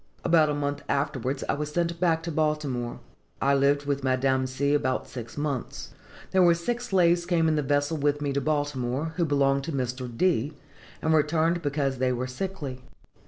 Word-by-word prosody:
About 160 Hz, -3 st, +5 dB
a 145 Hz, -, 0 dB
month 145 Hz, 0 st, -2 dB
afterwards, 140 Hz, -2 st, -1 dB
I -, -, +1 dB
was 150 Hz, +1 st, -3 dB
sent 170 Hz, +1 st, -1 dB
back 165 Hz, -2 st, +2 dB
to 170 Hz, -, -3 dB
Baltimore. 150 Hz, -6 st, -1 dB, 0.4 s
I 140 Hz, +1 st, +3 dB
lived 140 Hz, +1 st, +2 dB
with 140 Hz, -1 st, -1 dB
Madame 130 Hz, 0 st, +1 dB
C. 140 Hz, +2 st, 0 dB
about 130 Hz, -3 st, 0 dB
six 120 Hz, 0 st, -8 dB
months. 145 Hz, -4 st, -3 dB, 0.4 s
"There 190 Hz, -, +4 dB
were 170 Hz, -1 st, +6 dB
six 240 Hz, +8 st, -3 dB
slaves 175 Hz, -3 st, +3 dB
came 170 Hz, -2 st, +2 dB
in 155 Hz, -, +2 dB
the 150 Hz, -, +1 dB
vessel 145 Hz, +2 st, 0 dB
with 145 Hz, 0 st, +1 dB
me 145 Hz, -1 st, -2 dB
to 140 Hz, -, 0 dB
Baltimore, 145 Hz, 0 st, -1 dB
who 170 Hz, -, +2 dB
belonged 140 Hz, -2 st, +2 dB
to 165 Hz, -, -3 dB
Mr. 125 Hz, -2 st, -3 dB
D., 155 Hz, -5 st, +1 dB, 0.5 s
and 160 Hz, -, +2 dB
were 155 Hz, -, +6 dB
returned 165 Hz, +3 st, +1 dB
because 140 Hz, -3 st, -1 dB
they 130 Hz, 0 st, +2 dB
were 125 Hz, 0 st, -2 dB
sickly. 135 Hz, -2 st, -5 dB
145 Hz, 190 wpm, -27 LUFS, 135-160 Hz, 0.5 s, were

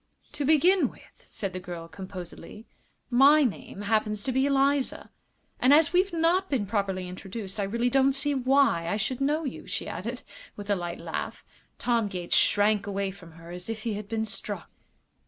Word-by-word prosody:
"To 290 Hz, -, -3 dB
begin 340 Hz, +6 st, +4 dB
with," -, -, -17 dB, 0.2 s
said 195 Hz, -3 st, -5 dB
the 185 Hz, -, -4 dB
girl, 175 Hz, -2 st, -7 dB
composedly, 185 Hz, +4 st, -9 dB, 0.5 s
"my 280 Hz, +5 st, +7 dB
name 205 Hz, -4 st, -3 dB
happens 210 Hz, -1 st, 0 dB
to 260 Hz, -, 0 dB
be 265 Hz, +2 st, +2 dB
Eliza. 275 Hz, 0 st, +1 dB, 0.5 s
And 255 Hz, -, +4 dB
as 325 Hz, +2 st, +4 dB
we've 370 Hz, +2 st, +3 dB
not 345 Hz, +3 st, +2 dB
been 250 Hz, -8 st, 0 dB
properly 195 Hz, -3 st, -1 dB
introduced 190 Hz, +3 st, -6 dB
I 200 Hz, -, +1 dB
really 235 Hz, +5 st, 0 dB
don't 270 Hz, +1 st, +4 dB
see 290 Hz, +2 st, +1 dB
why 265 Hz, -9 st, +3 dB
I 205 Hz, -, 0 dB
should 245 Hz, +5 st, -2 dB
know 300 Hz, +4 st, +1 dB
you," 270 Hz, -, -6 dB
she -, -, -4 dB
added, -, -, -5 dB, 0.3 s
with 205 Hz, 0 st, -5 dB
a -, -, +4 dB
light 175 Hz, -1 st, -4 dB
laugh. -, -, -5 dB, 0.3 s
Tom 235 Hz, -3 st, +1 dB
Gates 180 Hz, -3 st, -1 dB
shrank 205 Hz, 0 st, +3 dB
away 200 Hz, -1 st, -2 dB
from 175 Hz, -4 st, -14 dB
her 165 Hz, +1 st, -12 dB
as 180 Hz, +3 st, -6 dB
if 220 Hz, -1 st, -4 dB
he 230 Hz, -, -1 dB
had 205 Hz, 0 st, -5 dB
been 220 Hz, -1 st, -1 dB
struck. 200 Hz, -3 st, -4 dB
220 Hz, 185 wpm, -27 LUFS, 195-275 Hz, 0.5 s, my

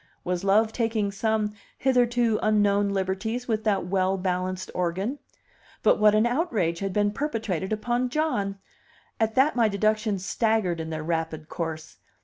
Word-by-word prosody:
Was 180 Hz, 0 st, -2 dB
love 215 Hz, +3 st, +3 dB
taking 225 Hz, -4 st, 0 dB
some 215 Hz, +1 st, 0 dB, 0.2 s
hitherto 240 Hz, -4 st, +2 dB
unknown 205 Hz, -1 st, +3 dB
liberties 200 Hz, +5 st, -2 dB
with 220 Hz, -2 st, -1 dB
that 195 Hz, -4 st, +1 dB
well 190 Hz, +1 st, +1 dB
balanced 185 Hz, 0 st, -2 dB
organ? 190 Hz, +10 st, -2 dB, 0.6 s
But -, -, +4 dB
what 210 Hz, 0 st, +5 dB
an 215 Hz, +2 st, +4 dB
outrage 235 Hz, -, 0 dB
had 195 Hz, -1 st, -2 dB
been 205 Hz, +1 st, +1 dB
perpetrated 215 Hz, -, -2 dB
upon 240 Hz, +3 st, 0 dB
John! 245 Hz, -10 st, -1 dB, 0.6 s
At 220 Hz, -1 st, +1 dB
that 275 Hz, +4 st, +4 dB
my 235 Hz, -2 st, +4 dB
deductions 210 Hz, -1 st, 0 dB
staggered 215 Hz, -5 st, +1 dB
in 160 Hz, 0 st, -4 dB
their 155 Hz, -1 st, -4 dB
rapid 160 Hz, -1 st, -3 dB
course. 160 Hz, -2 st, -5 dB
205 Hz, 145 wpm, -26 LUFS, 185-225 Hz, 0.6 s, what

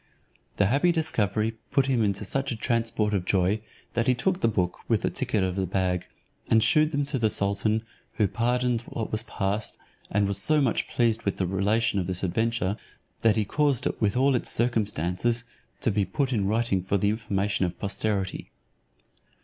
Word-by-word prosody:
The 100 Hz, -, +4 dB
happy 140 Hz, -, +3 dB
discovery 110 Hz, -, 0 dB
put 135 Hz, -, +2 dB
him 130 Hz, -4 st, +2 dB
into 100 Hz, 0 st, -1 dB
such 135 Hz, +6 st, -1 dB
a -, -, -2 dB
transport 115 Hz, -2 st, 0 dB
of 95 Hz, -3 st, +1 dB
joy, 95 Hz, +3 st, +1 dB, 0.3 s
that 115 Hz, +1 st, 0 dB
he 130 Hz, -, +4 dB
took 180 Hz, +10 st, 0 dB
the -, -, +4 dB
book, 90 Hz, -5 st, -1 dB
with 115 Hz, -3 st, +1 dB
the -, -, +1 dB
ticket 115 Hz, -6 st, 0 dB
of 90 Hz, -1 st, -1 dB
the 95 Hz, -1 st, -1 dB
bag, 90 Hz, -1 st, -1 dB, 0.4 s
and 110 Hz, -1 st, +5 dB
shewed 155 Hz, +6 st, +4 dB
them 145 Hz, -1 st, 0 dB
to 140 Hz, -1 st, -1 dB
the 110 Hz, -2 st, +2 dB
sultan, 100 Hz, +2 st, +1 dB, 0.3 s
who 105 Hz, -, +2 dB
pardoned 120 Hz, +2 st, 0 dB
what 115 Hz, -, -4 dB
was 110 Hz, -, +1 dB
past, 105 Hz, -1 st, -3 dB, 0.3 s
and 100 Hz, 0 st, +1 dB
was 100 Hz, 0 st, 0 dB
so 155 Hz, +9 st, +3 dB
much 130 Hz, -6 st, +1 dB
pleased 115 Hz, -2 st, +1 dB
with 100 Hz, -, -2 dB
the 95 Hz, -, 0 dB
relation 100 Hz, +3 st, +1 dB
of 90 Hz, -, -2 dB
this 95 Hz, 0 st, -3 dB
adventure, 110 Hz, +1 st, 0 dB, 0.4 s
that 115 Hz, -1 st, +4 dB
he 110 Hz, -2 st, +1 dB
caused 145 Hz, +2 st, +1 dB
it -, -, -2 dB
with 105 Hz, +1 st, +1 dB
all 135 Hz, +2 st, +4 dB
its 125 Hz, -, 0 dB
circumstances 115 Hz, -1 st, 0 dB, 0.4 s
to 115 Hz, -, +2 dB
be 100 Hz, 0 st, +1 dB
put 130 Hz, +8 st, -1 dB
in 100 Hz, -4 st, +1 dB
writing 110 Hz, -3 st, +1 dB
for 95 Hz, +2 st, 0 dB
the 100 Hz, +2 st, +1 dB
information 100 Hz, -3 st, 0 dB
of 85 Hz, -, -7 dB
posterity. 100 Hz, -1 st, -2 dB
110 Hz, 190 wpm, -26 LUFS, 100-120 Hz, 0.4 s, and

